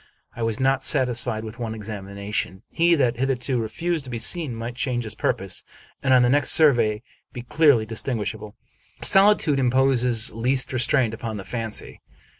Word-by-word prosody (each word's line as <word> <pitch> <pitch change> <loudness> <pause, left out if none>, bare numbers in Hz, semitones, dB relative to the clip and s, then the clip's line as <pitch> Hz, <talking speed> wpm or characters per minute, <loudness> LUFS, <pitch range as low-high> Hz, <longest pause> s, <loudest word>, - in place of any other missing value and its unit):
I - - -8
was 115 -1 -2
not 135 0 +1
satisfied 125 -5 +2
with 110 +2 -9
one 115 -2 -4
examination. 100 -1 -6
He 170 +1 +3
that 125 -5 0
hitherto 130 -1 -1
refused 160 +8 -3
to - - -9
be 120 - -4
seen 135 +2 0
might 115 +2 -6
change 125 -1 -2
his 110 - -4
purpose, - - -2 0.4
and 135 - 0
on 130 -1 +5
the - - +3
next 145 0 +3
survey 120 -8 +3 0.3
be 120 - -7
clearly 140 -4 +3
distinguishable. 110 -2 -4 0.5
Solitude 195 -7 +4
imposes 125 -2 +2
least 125 +3 -1
restraint 125 -2 +1
upon 110 -1 -6
the 95 - -7
fancy. 115 +1 -5
120 Hz, 160 wpm, -23 LUFS, 110-135 Hz, 0.5 s, on